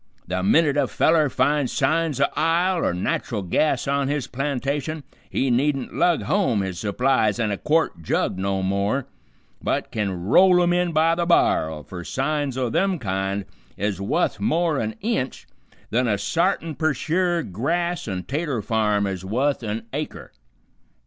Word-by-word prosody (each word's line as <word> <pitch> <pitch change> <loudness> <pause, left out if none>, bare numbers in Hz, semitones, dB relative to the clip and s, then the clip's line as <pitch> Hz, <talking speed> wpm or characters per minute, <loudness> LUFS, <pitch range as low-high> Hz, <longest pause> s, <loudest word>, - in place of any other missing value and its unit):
The 90 +1 -2
minute 145 - +3
a 140 -2 +2
feller 155 +1 +3
finds 135 +1 +1
signs 155 +1 +1
o' 140 - +5
ile 170 +3 +2
or - - +2
nat'ral 95 +4 -2
gas 135 - +1
on 140 0 +1
his 145 -2 -1
plantation 140 +3 -3 0.3
he 135 -1 0
needn't 135 +2 0
lug 175 -2 +2
home 175 - +1
his 95 -2 -4
supplies 110 0 +1
in 110 -3 0
a 100 - -2
quart 160 - +1
jug 85 +3 -1
no 95 0 -1
more, 100 +7 0 0.6
but - - -2
kin 95 -5 -2
roll 180 - +6
'em 175 0 +2
in 175 -1 +1
by 160 +1 +3
the 170 0 -1
bar'l, 80 - +2
fer 90 +3 -8
signs 140 - -2
o' 130 -1 0
them 185 +8 +1
kind 95 - -2 0.3
is 100 -1 -2
wuth 155 - 0
more 170 -7 +1
an 110 0 -3
inch 210 - -2 0.5
th'n 125 +2 +2
a 105 -2 +1
sartin 165 - 0
per 155 0 0
sure 170 +4 0
grass 170 - -2
an' 95 -3 -3
'tater 140 - -2
farm 105 -2 +1
is 95 -2 -4
wuth 130 +9 0
an 110 0 -3
acre." 150 +2 -5
135 Hz, 160 wpm, -23 LUFS, 105-160 Hz, 0.6 s, roll